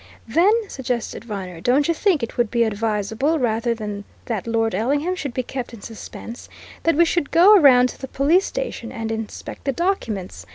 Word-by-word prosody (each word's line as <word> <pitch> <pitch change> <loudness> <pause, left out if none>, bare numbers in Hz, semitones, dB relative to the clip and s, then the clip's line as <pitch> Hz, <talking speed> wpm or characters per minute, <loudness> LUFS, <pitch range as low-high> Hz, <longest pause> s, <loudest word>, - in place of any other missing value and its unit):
"Then," 400 - +3
suggested 250 - -4
Viner, 185 -6 -6
"don't 265 +7 +2
you 335 - +2
think 335 - +1
it 230 - -4
would 240 -2 +1
be 235 0 +2
advisable, 220 +7 0
rather 235 -2 0
than 210 -2 -5 0.2
that 225 -3 -3
Lord 225 -1 0
Ellingham 285 - 0
should 285 -7 -4
be 255 +1 -2
kept 245 -1 -6
in 210 - -14
suspense, 230 +2 -9 0.3
that 330 - +2
we 340 +3 +5
should 335 -3 0
go 380 +6 +7
round 255 -5 +6
to - - -11
the 265 - -5
police 310 +9 +2
station - - -4
and 225 -3 -4
inspect 225 -1 -6
the 275 - 0
documents? 240 - -3
245 Hz, 190 wpm, -22 LUFS, 225-310 Hz, 0.3 s, go